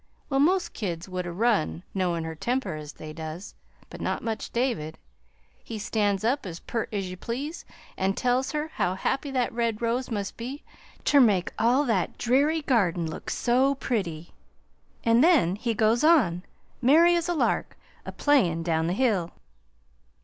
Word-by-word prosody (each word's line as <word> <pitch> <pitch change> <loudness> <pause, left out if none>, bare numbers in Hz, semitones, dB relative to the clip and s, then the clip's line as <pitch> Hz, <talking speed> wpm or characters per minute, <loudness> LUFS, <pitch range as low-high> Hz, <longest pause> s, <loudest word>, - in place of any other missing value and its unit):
Well, 270 - +2
most 360 +6 +2
kids 175 -4 -4
would 185 -1 -4
'a' - - -4
run, 195 -4 0
knowin' 175 -4 0
her 160 0 -4
temper 245 +10 -2
as 150 -1 -7
they 155 0 -9
does, 160 +4 -7 0.4
but - - -9
not - - -2
much 225 -2 -3
David. 235 -11 -1 0.7
He 225 - -6
stands 205 -2 0
up 260 +5 +1
as 170 -3 -7
pert 230 -2 -3
as 200 -3 -2
ye 185 - -6
please, 265 - -5 0.3
an' 190 0 +1
tells 250 +1 +1
her 300 +1 -2
how 180 - -1
happy 270 +8 -1
that 255 -4 -1
red 230 -2 -1
rose 240 +2 -1
must 205 -4 -4
be 255 +5 -6 0.4
ter 285 - +5
make 205 -8 +3
all 245 +6 +3
that 215 -8 0
dreary 285 +6 +2
garden 185 - +1
look 160 - -7
so 260 +3 +2
pretty; 180 - -3 0.7
an' 230 +1 +4
then 285 - +4
he 230 +2 -2
goes 220 +4 +2
on, 265 - +4 0.4
merry 320 +7 +6
as 340 0 -1
a 350 - +1
lark, - - 0 0.3
a - - -6
playin' 185 - +2
down 160 -1 0
the 175 - 0
hill. 200 -7 +1
225 Hz, 170 wpm, -26 LUFS, 180-265 Hz, 0.7 s, merry